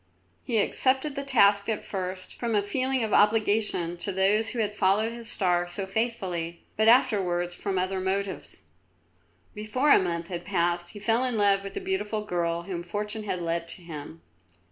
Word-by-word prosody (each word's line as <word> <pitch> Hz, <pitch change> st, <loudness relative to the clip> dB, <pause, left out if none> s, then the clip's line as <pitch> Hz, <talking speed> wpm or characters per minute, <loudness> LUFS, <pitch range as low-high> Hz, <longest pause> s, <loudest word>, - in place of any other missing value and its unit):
He 235 Hz, -, -3 dB
had 210 Hz, -, +3 dB
accepted 265 Hz, +3 st, +1 dB
the 280 Hz, 0 st, -4 dB
task 200 Hz, -6 st, +4 dB
at 220 Hz, -, -2 dB
first 185 Hz, -1 st, -5 dB
from 235 Hz, -2 st, -1 dB
a 205 Hz, -, +2 dB
feeling 260 Hz, +4 st, 0 dB
of 220 Hz, -, -2 dB
obligation 210 Hz, -5 st, +2 dB
to 185 Hz, +3 st, -1 dB
those 200 Hz, +4 st, +2 dB
who 250 Hz, -, -5 dB
had 210 Hz, -2 st, -1 dB
followed 205 Hz, +3 st, +2 dB
his 235 Hz, 0 st, -8 dB
star 175 Hz, -4 st, +1 dB
so 185 Hz, +3 st, -4 dB
faithfully, 190 Hz, -6 st, -3 dB
but 220 Hz, +1 st, +2 dB
afterwards 195 Hz, -8 st, +3 dB
from 190 Hz, +2 st, -3 dB
other 185 Hz, +1 st, -1 dB
motives. 190 Hz, +1 st, -3 dB, 0.9 s
Before 235 Hz, +8 st, 0 dB
a -, -, +8 dB
month 170 Hz, -2 st, -3 dB
had 175 Hz, -1 st, -5 dB
passed 175 Hz, -2 st, 0 dB
he -, -, -9 dB
fell 225 Hz, +4 st, +1 dB
in 250 Hz, -3 st, -1 dB
love 200 Hz, -1 st, +3 dB
with 195 Hz, 0 st, -8 dB
the -, -, -2 dB
beautiful 210 Hz, +2 st, -2 dB
girl 170 Hz, -3 st, -1 dB
whom 175 Hz, -1 st, -5 dB
Fortune 210 Hz, +5 st, -4 dB
had 180 Hz, -4 st, -3 dB
led 170 Hz, 0 st, -2 dB
to 175 Hz, -, -8 dB
him. 145 Hz, -, -9 dB
200 Hz, 185 wpm, -27 LUFS, 175-220 Hz, 0.9 s, a